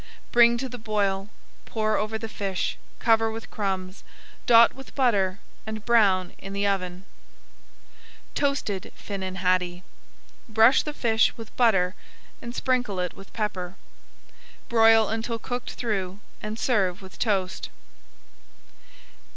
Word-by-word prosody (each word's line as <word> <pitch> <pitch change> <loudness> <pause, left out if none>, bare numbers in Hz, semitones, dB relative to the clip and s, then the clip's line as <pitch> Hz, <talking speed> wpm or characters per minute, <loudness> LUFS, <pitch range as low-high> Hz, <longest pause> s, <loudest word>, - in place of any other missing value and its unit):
Bring 235 0 +6
to 265 +2 -3
the 245 -1 -8
boil, 205 -3 -1 0.4
pour 215 -1 0
over 215 +1 -1
the 225 - -5
fish, 200 -3 -2 0.2
cover 225 -1 +3
with 225 0 -7
crumbs, 190 -2 -3 0.4
dot 230 -1 +7
with 270 0 -13
butter, 205 -8 +2 0.3
and 220 -1 -5
brown 200 -6 +3
in 195 +1 -7
the 200 +1 0
oven. 185 -2 -2 1.3
TOASTED 280 -9 -1
FINNAN 190 -2 -5
HADDIE 180 -1 0 0.7
Brush 225 +3 +6
the 300 - -5
fish 225 -4 +2
with 225 -2 -10
butter 195 -7 +3 0.5
and 235 +1 -7
sprinkle 250 -7 0
it 180 -1 -2
with 195 - -14
pepper. 190 -4 -3 0.9
Broil 225 -1 +6
until 225 +1 -2
cooked 245 +2 -5
through, 195 -5 -3 0.2
and 215 +1 -5
serve 195 -7 +1
with 190 - -13
toast. 195 -5 -1
215 Hz, 125 wpm, -26 LUFS, 190-230 Hz, 1.3 s, dot